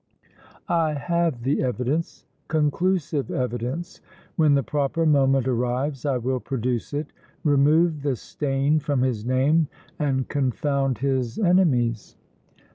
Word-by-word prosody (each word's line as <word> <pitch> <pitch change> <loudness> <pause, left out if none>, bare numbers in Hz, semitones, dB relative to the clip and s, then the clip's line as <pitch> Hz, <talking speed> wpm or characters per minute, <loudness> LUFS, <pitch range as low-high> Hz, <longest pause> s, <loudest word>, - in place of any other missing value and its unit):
I 165 -4 +1
have 165 -4 -1
the 135 +3 +1
evidence, 130 +5 -2 0.2
conclusive 155 -1 0
evidence! 125 +6 -3 0.3
When 155 -4 +4
the 140 - +2
proper 145 +6 -1
moment 135 -3 +3
arrives 125 +3 -1
I 135 -3 +1
will 130 +2 -1
produce 125 -2 -3
it, 145 +1 -4 0.3
remove 150 +2 +3
the 140 -2 0
stain 140 +4 0
from 145 -3 -1
his 120 -5 -1
name 135 +6 +2 0.3
and 135 -3 0
confound 135 -1 0
his 130 -2 -1
enemies!" 145 - +2
140 Hz, 120 wpm, -24 LUFS, 130-155 Hz, 0.3 s, When